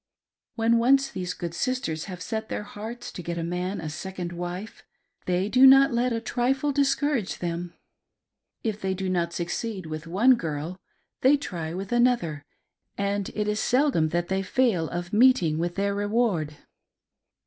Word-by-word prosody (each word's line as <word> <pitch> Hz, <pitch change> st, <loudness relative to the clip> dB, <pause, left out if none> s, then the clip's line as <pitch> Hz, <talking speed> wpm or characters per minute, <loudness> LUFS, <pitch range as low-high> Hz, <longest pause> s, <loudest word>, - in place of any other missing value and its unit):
When 230 Hz, 0 st, +3 dB
once 270 Hz, +3 st, +4 dB
these 180 Hz, -1 st, -4 dB
good 170 Hz, -1 st, -5 dB
sisters 175 Hz, -, -2 dB
have 180 Hz, -2 st, -7 dB
set 220 Hz, -1 st, -4 dB
their -, -, -3 dB
hearts 220 Hz, +4 st, -7 dB
to 180 Hz, -, -7 dB
get 170 Hz, 0 st, -4 dB
a 165 Hz, -, -2 dB
man 180 Hz, +3 st, -2 dB
a 160 Hz, -, -5 dB
second 175 Hz, +3 st, -5 dB
wife, 175 Hz, +4 st, -6 dB, 0.4 s
they 180 Hz, +2 st, +1 dB
do 255 Hz, +5 st, +7 dB
not 270 Hz, -1 st, +7 dB
let 245 Hz, +1 st, +1 dB
a 230 Hz, -, 0 dB
trifle 260 Hz, +5 st, 0 dB
discourage 280 Hz, -4 st, +1 dB
them; 175 Hz, 0 st, -4 dB, 0.9 s
if 215 Hz, -2 st, -2 dB
they 190 Hz, 0 st, -1 dB
do 190 Hz, 0 st, -3 dB
not 170 Hz, -2 st, 0 dB
succeed 185 Hz, +3 st, -3 dB
with 155 Hz, +1 st, -6 dB
one 210 Hz, +10 st, +5 dB
girl, 165 Hz, -3 st, -4 dB, 0.4 s
they 275 Hz, +3 st, +5 dB
try 170 Hz, -, -5 dB
with 195 Hz, +3 st, -5 dB
another, 240 Hz, -, +2 dB, 0.5 s
and 200 Hz, 0 st, -1 dB
it 210 Hz, -1 st, -1 dB
is 210 Hz, 0 st, 0 dB
seldom 250 Hz, -, +2 dB
that 175 Hz, +1 st, -1 dB
they 190 Hz, 0 st, 0 dB
fail 195 Hz, -6 st, +1 dB
of 175 Hz, +2 st, -5 dB
meeting 210 Hz, -10 st, +4 dB
with 175 Hz, +1 st, -2 dB
their 200 Hz, 0 st, 0 dB
reward. 205 Hz, -7 st, 0 dB
195 Hz, 165 wpm, -26 LUFS, 175-240 Hz, 0.9 s, do